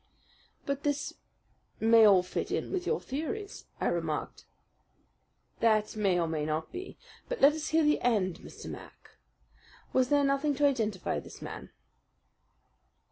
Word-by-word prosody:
"But 280 0 -2
this 290 0 -1 0.7
may 225 0 +6
all 195 -3 +6
fit 180 - -3
in - - -2
with 365 -2 -2
your 455 - +1
theories," 325 +9 -5
I - - -1
remarked. - - -2 1.1
"That 215 -2 +2
may 195 -4 +2
or 165 - +1
may 160 -2 -2
not 155 +1 -2
be. 370 +1 -7 0.3
But - - -3
let 280 +2 +7
us 310 0 -4
hear 320 0 +3
the 300 0 +3
end, 200 -7 +1
Mr. - - -11
Mac. - - -11 0.8
Was 255 -1 +3
there 290 -1 +4
nothing 275 +1 +1
to 290 +2 +2
identify 220 -9 0
this - - -12
man?" - - -8
265 Hz, 145 wpm, -30 LUFS, 205-300 Hz, 1.1 s, let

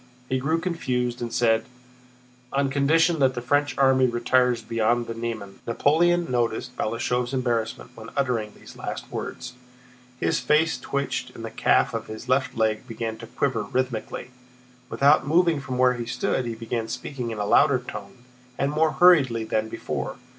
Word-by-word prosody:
He 130 0 +1
grew 160 +5 0
confused 125 -9 -2
and 120 -1 -3
said: 115 -2 +2 0.9
"On 140 0 +1
condition 160 +4 +3
that 130 -2 +3
the - - -2
French 145 +2 +1
army 130 -1 +4
retires 120 0 +2
beyond 115 +1 +1
the 115 - -5
Niemen." 115 -4 -5
Napoleon 170 +8 +3
noticed 120 +1 -1
Balashëv's 120 +3 -1
embarrassment 120 -2 -2
when 115 -1 -10
uttering 120 -6 0
these - - -14
last - - -6
words; 125 -1 -6 0.7
his - - +1
face 150 +5 +2
twitched 140 0 -3
and - - -7
the - - -6
calf - - +2
of - - -4
his 110 +3 -8
left 130 -1 +1
leg 110 +1 0
began 115 -1 -4
to 115 0 -10
quiver 125 -2 -1
rhythmically. 125 +2 -3 0.6
Without 145 +1 +4
moving 165 -1 +3
from 130 -2 -4
where 125 0 +4
he 120 -2 -5
stood 125 +1 -1
he 115 - -3
began 115 0 -3
speaking 125 -2 -5
in 110 - -5
a 105 - -1
louder - - +5
tone 125 - -9 0.3
and 140 +1 0
more 155 +1 +2
hurriedly 140 -11 +5
than 110 0 -1
before. - - -4
125 Hz, 165 wpm, -25 LUFS, 115-140 Hz, 0.9 s, louder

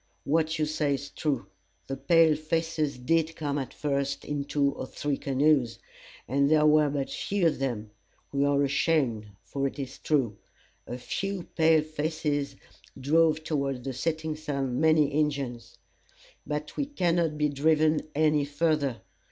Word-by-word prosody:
What 160 +1 +1
you 155 - +1
say 150 -2 0
is 140 +1 -8
true. 140 -9 -2 0.4
The 135 - -4
pale 165 +2 +4
faces 155 -2 -1
did 160 +5 +1
come 145 -2 -2
at 135 - -5
first 140 -1 -2
in 145 -1 -3
two 140 -1 +1
or 130 - -6
three 145 +1 -2
canoes, 135 -3 +2 0.5
and 140 +3 +2
there 155 -1 +4
were 150 -1 +5
but 140 -1 -3
few 200 -3 -1
of 155 -4 +2
them. 115 -6 -3 0.4
We 140 0 +1
are 145 0 +3
ashamed, 135 -6 +1 0.2
for 140 0 -2
it 135 - -7
is 135 -2 -6
true. 130 -9 0 0.5
A 120 - -5
few 195 +8 -3
pale 160 -1 +4
faces 150 -2 -2 0.4
drove 155 +3 +3
toward 140 -5 -2
the 135 0 -4
setting 160 +3 -2
sun 140 -4 -2
many 155 -2 +4
Injins. 140 -6 -2 0.7
But 150 0 -4
we 285 - -1
cannot 170 - 0
be 150 0 +2
driven 155 +2 +2
any 150 -1 +3
further. 145 - 0
150 Hz, 150 wpm, -28 LUFS, 140-155 Hz, 0.7 s, were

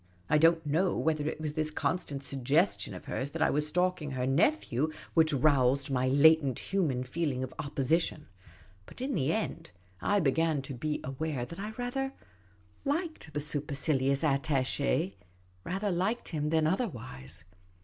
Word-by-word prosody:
I 150 - +5
don't 165 0 +4
know 165 +6 +1
whether 155 -2 0
it - - -6
was 155 -1 -3
this 155 0 0
constant 150 -3 -2
suggestion 140 +7 +1
of - - -10
hers 135 - -3
that 160 +2 -6
I - - +3
was 150 +1 +1
stalking 180 -1 0
her 130 -2 -2
nephew 145 - +2 0.2
which 160 -1 +4
roused 140 -1 +3
my 130 -1 +1
latent 140 0 +5
human 155 -10 0
feeling 130 -1 -2
of 130 - -6
opposition; 150 +2 0 0.6
but - - -13
in 265 +2 -2
the 150 -4 +1
end, 220 +3 -3 0.3
I 205 0 +2
began 155 -1 +1
to 135 - -6
be 150 +5 -2
aware 135 -1 -3
that 170 +7 -9
I 210 +2 -4
rather 270 +2 -2 0.7
liked 310 - -2
the - - +1
supercilious 140 -1 0
attache 135 - +1 0.5
than 180 -5 0
other 190 +10 +1
wise. 90 - -6
150 Hz, 150 wpm, -30 LUFS, 135-170 Hz, 0.7 s, I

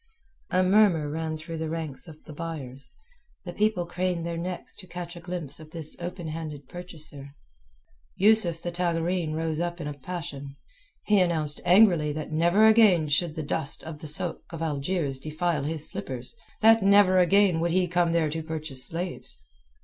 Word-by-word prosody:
A 185 0 +3
murmur 185 -6 +4
ran 160 0 -3
through 165 +1 -7
the 160 -1 -3
ranks 160 -2 -5
of 155 -1 -13
the 155 - -10
buyers, 145 -5 -6 0.5
the - - -6
people 210 -4 +1
craned 175 -1 -2
their 170 0 -3
necks 180 +2 -5
to 185 - -11
catch 175 0 -7
a - - -8
glimpse 170 -5 -5
of 155 -1 -12
this 160 -1 -3
open 175 -1 -5
handed 155 -3 -6
purchaser. 155 -5 -9 0.8
Yusuf 190 -5 +3
the 175 - -2
Tagareen 170 -1 -1
rose 160 -1 -2
up 175 0 -2
in 160 - -5
a 145 - -3
passion. 140 -2 -7 0.5
He 210 -2 +4
announced 160 -5 0
angrily 175 -5 +5
that 155 0 -5
never 170 +7 +4
again 210 -8 +5
should 155 +2 +1
the 155 - -3
dust 145 0 -1
of 160 -2 -8
the 155 - -8
sôk 160 +3 -1
of 165 -1 -5
Algiers 145 -2 -1
defile 155 0 -1
his 155 0 -3
slippers, 125 - -5 0.3
that 225 0 +6
never 195 -1 +5
again 185 -1 +4
would 170 +1 +1
he 180 +1 +2
come 175 -1 +2
there 165 -3 +1
to 160 +1 -3
purchase 155 -4 -5
slaves. 175 +2 -5
165 Hz, 175 wpm, -27 LUFS, 155-180 Hz, 0.8 s, that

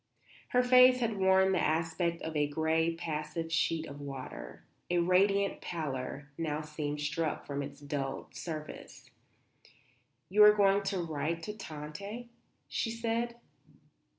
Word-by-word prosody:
Her 250 0 +3
face 250 0 +7
had 225 -4 -1
worn 190 0 +5
the 185 - +2
aspect 165 +2 0
of 160 -1 -4
a 145 -1 +2
grey, 160 +2 +1
passive 165 0 -4
sheet 165 0 +1
of 145 -1 -9
water; 130 - -8 0.2
a 175 - +2
radiant 195 +3 +3
pallor 145 -3 -4
now 155 -2 -1
seemed 150 -1 -4
struck 150 +2 -2
from 140 0 -3
its 140 - -7
dulled 140 -2 -4
surface. 155 -3 -7 1.2
"You 210 +3 +6
are 210 0 +9
going 200 -1 +4
to 195 0 -1
write 160 +1 -2
to 210 - -4
Tante?" 200 +7 -7 0.4
she 230 - -1
said. 230 +1 -1
165 Hz, 135 wpm, -31 LUFS, 150-200 Hz, 1.2 s, are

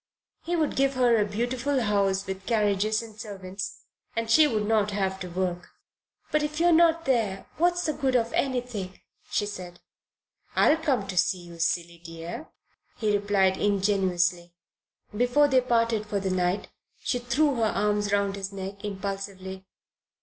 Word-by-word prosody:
He 345 - -2
would 315 -3 0
give 275 0 +2
her 245 -2 +4
a 210 -2 +3
beautiful 245 +6 -1
house 200 -3 +1
with 190 0 -6
carriages 215 -1 +1
and 220 -2 -11
servants, 195 -2 -6 0.3
and 230 0 -1
she 310 +4 +7
would 215 -6 0
not 210 -1 +2
have 190 -2 -1
to 180 - -6
work. 180 0 -3 0.6
"But 305 - +2
if 300 +1 -3
you 340 - +3
are 350 - +6
not 330 0 +4
there, 220 -7 0
what's 350 +1 +2
the 310 - 0
good 265 -3 0
of 235 -1 +1
anything?" 245 -8 -2 0.3
she 205 - 0
said. 180 -4 -7 0.8
"I'll 310 - +5
come 275 -10 0
to 190 - -5
see 180 +1 +2
you, 170 -1 -12
silly 170 0 -1
dear," 165 - -7 0.5
he 210 -2 +1
replied 200 -2 +2
ingenuously. 185 -4 +1 0.6
Before 245 +6 +4
they 260 -2 +4
parted 230 -3 +1
for 205 -1 -1
the 190 -1 -2
night 180 +1 0 0.3
she 245 - 0
threw 265 +3 +1
her 225 - +2
arms 210 -1 0
round 200 -1 +1
his 195 0 -4
neck 195 0 -7
impulsively. 195 -1 -5
205 Hz, 165 wpm, -27 LUFS, 190-245 Hz, 0.8 s, she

